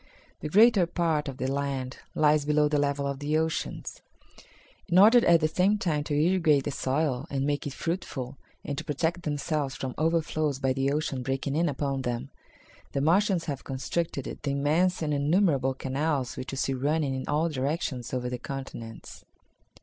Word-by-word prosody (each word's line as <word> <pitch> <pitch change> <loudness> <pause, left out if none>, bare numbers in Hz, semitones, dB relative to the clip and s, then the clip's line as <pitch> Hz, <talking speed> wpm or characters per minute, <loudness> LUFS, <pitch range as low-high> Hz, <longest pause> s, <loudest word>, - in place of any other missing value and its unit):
The 150 - -5
greater 205 0 +6
part 165 -4 0
of 135 -2 -5
the 130 - -3
land 135 -1 -2 0.2
lies 150 -1 +4
below 150 0 +3
the 150 0 +1
level 140 0 0
of 140 -1 -3
the 150 +2 0
oceans. 160 0 -3 0.9
In 175 - +2
order 225 +5 +8
at 170 -1 +6
the 155 - +3
same 185 +6 +2
time 155 -7 0
to 150 - -1
irrigate 160 -4 +3
the 145 - -2
soil 135 0 -1
and 135 -1 -1
make 145 0 -1
it 140 - -5
fruitful, 140 -7 -4 0.3
and 145 - -3
to - - -5
protect 160 +3 -1
themselves 145 -2 -2
from 130 -1 -4
overflows 155 -3 +1
by 135 -1 +1
the 135 +1 0
ocean 145 -3 -1
breaking 135 +2 -2
in 170 +2 +2
upon 140 -1 -2
them, 125 +2 -3 0.6
the - - 0
Martians 180 +3 +2
have 140 -4 -4
constructed 140 +2 -3
the 145 - -2
immense 160 +6 +1
and 150 -1 0
innumerable 145 -3 +2
canals 135 0 -1
which 130 - -6
you 135 - -5
see 135 - 0
running 145 +2 0
in 130 0 -4
all 150 +3 +1
directions 140 -4 -2
over 125 -1 -2
the 125 0 -4
continents." 125 -5 -8
145 Hz, 180 wpm, -27 LUFS, 135-160 Hz, 0.9 s, order